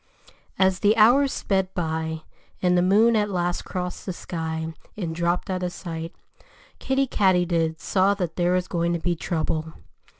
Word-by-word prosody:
As 190 -1 +3
the 210 +2 +3
hours 255 +6 +5
sped 190 -2 -1
by 160 -2 -2 0.4
and 180 -1 +2
the 175 - +4
moon 215 +6 +4
at 210 -1 +1
last 175 -2 -1
crossed 180 -1 -4
the 185 - -2
sky 160 -2 -4 0.2
and 170 -6 -3
dropped 170 +1 0
out 185 -1 -2
of 180 -1 -2
sight, 165 -2 -6 0.6
Kiddie 270 0 +1
Katydid 175 -7 +1
saw 195 +1 +2
that 180 -5 -3
there 175 0 +1
was 185 0 0
going 170 -1 0
to 170 - -1
be 175 +1 -1
trouble. 160 -1 -2
180 Hz, 165 wpm, -24 LUFS, 165-190 Hz, 0.6 s, hours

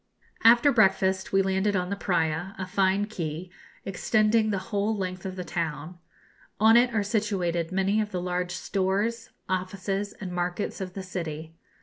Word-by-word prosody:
] - - -24
After 240 +4 +3
breakfast 190 -4 +2
we 195 0 +4
landed 190 +2 +1
on 180 0 -1
the - - 0
Praya, 175 0 -1
a 190 - -3
fine 195 +1 +1
quay, 175 -4 -5 0.3
extending 215 +3 +2
the 200 - 0 0.2
whole 205 +2 +1
length 185 -1 -4
of 185 - -6
the 180 - -4
town. 170 0 -4 0.6
On 220 +2 +6
it 240 +1 +5
are 220 -3 +1
situated 190 -5 -1
many 195 +3 +2
of 210 - -3
the 185 - -3
large 180 0 -2
stores, 200 +5 -1 0.2
offices, 195 +2 -2
and 190 -3 -7
markets 180 +3 -3
of 185 -1 -5
the 195 - -6
city. 160 -4 -5
190 Hz, 165 wpm, -27 LUFS, 180-205 Hz, 0.6 s, On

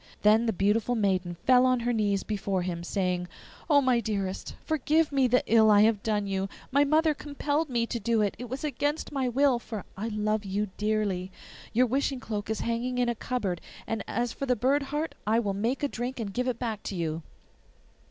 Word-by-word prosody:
Then 220 +3 +5
the - - +3
beautiful 210 +5 +1
maiden 185 -5 0
fell 255 -1 +6
on 255 -1 +3
her 240 +1 0
knees 205 -3 +1
before 195 -3 -2
him, 170 -1 -3
saying, 180 -1 -1 0.4
'Oh, 290 -2 +6
my 255 -3 +3
dearest, 200 -4 -3
forgive 315 +1 +2
me 270 -2 +3
the 250 +1 +3
ill 220 -1 +5
I 205 -1 +7
have 215 -1 +3
done 210 -2 0
you! 195 0 -2 0.2
My 280 +2 +5
mother 310 +2 +3
compelled 290 +1 -2
me 235 -2 +1
to 235 - -3
do 225 0 +1
it; 200 - 0
it 245 -1 -6
was 260 +4 -5
against 290 +1 -1
my 265 -3 0
will, 265 0 +3
for 220 -4 -7
I 210 +4 -3
love 215 -1 -1
you 200 +1 -2
dearly. 205 -3 -1 0.4
Your 250 +3 +4
wishing 270 +2 0
cloak 210 -4 -4
is 220 - -1
hanging 240 +2 -1
in 245 -1 +2
a - - +1
cupboard, 205 -8 -2 0.2
and 225 -2 -3
as 240 +1 -1
for 275 - -4
the 250 - +3
bird 265 +6 +2
heart 295 +3 -3
I 220 +1 +3
will 205 -4 0
make 230 +8 -1
a - - +3
drink 250 0 -4
and 205 -4 -4
give 250 +3 -1
it 250 -3 -1
back 225 -4 -3
to 195 - -4
you. 165 -2 -2
230 Hz, 210 wpm, -28 LUFS, 205-255 Hz, 0.4 s, I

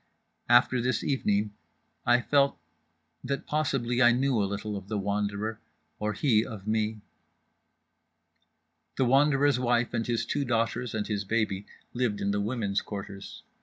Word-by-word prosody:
After 120 +1 +5
this 125 -2 0
evening 105 -6 0 0.5
I 120 0 +5
felt 140 +1 +2 0.7
that 140 +1 -3
possibly 130 -5 0
I 120 -1 +7
knew 130 +2 +1
a 100 - 0
little 105 +1 -4
of 100 -1 -7
The 105 0 -2
Wanderer, 100 +2 -2 0.4
or 105 0 -1
he 110 -3 +3
of 105 -5 -8
me. 110 0 -1 2.0
The 130 - +3
Wanderer's 140 +1 +4
wife 120 -1 +1
and 115 - -1
his 115 -1 0
two 145 +4 -1
daughters 120 -1 -1
and 105 -1 -1
his 105 -2 -2
baby 100 -2 -1 0.3
lived 120 -4 -1
in 100 - 0
the 100 0 0
women's 105 -2 -1
quarters. 100 -1 -8
115 Hz, 145 wpm, -28 LUFS, 105-125 Hz, 2.0 s, I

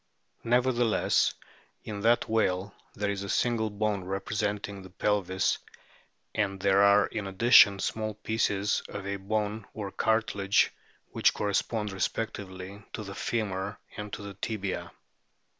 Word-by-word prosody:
Nevertheless 120 -1 +2 0.5
in 105 -2 -5
that 115 +3 +3
whale 100 -3 0 0.2
there 100 0 -1
is 100 -1 -3
a 100 - -5
single 115 -1 +1
bone 105 -2 -1
representing 100 +1 -3
the 95 - -11
pelvis, 95 0 0 0.7
and 100 -3 -1
there 100 +1 +4
are 100 0 +6
in 105 -3 -4
addition 100 0 +7
small 110 +2 -2
pieces 105 -2 0
of 100 - -6
a 100 0 -2
bone 105 +1 -2
or 100 -3 -4
cartilage, 105 -3 +2 0.4
which - - +3
correspond 105 +1 -1
respectively 95 -1 -4
to 110 - -4
the 100 -1 -7
femur 100 -3 -2 0.2
and 105 0 -6
to 105 - -5
the 100 -1 -7
tibia. 100 -1 -4
100 Hz, 130 wpm, -29 LUFS, 100-110 Hz, 0.7 s, addition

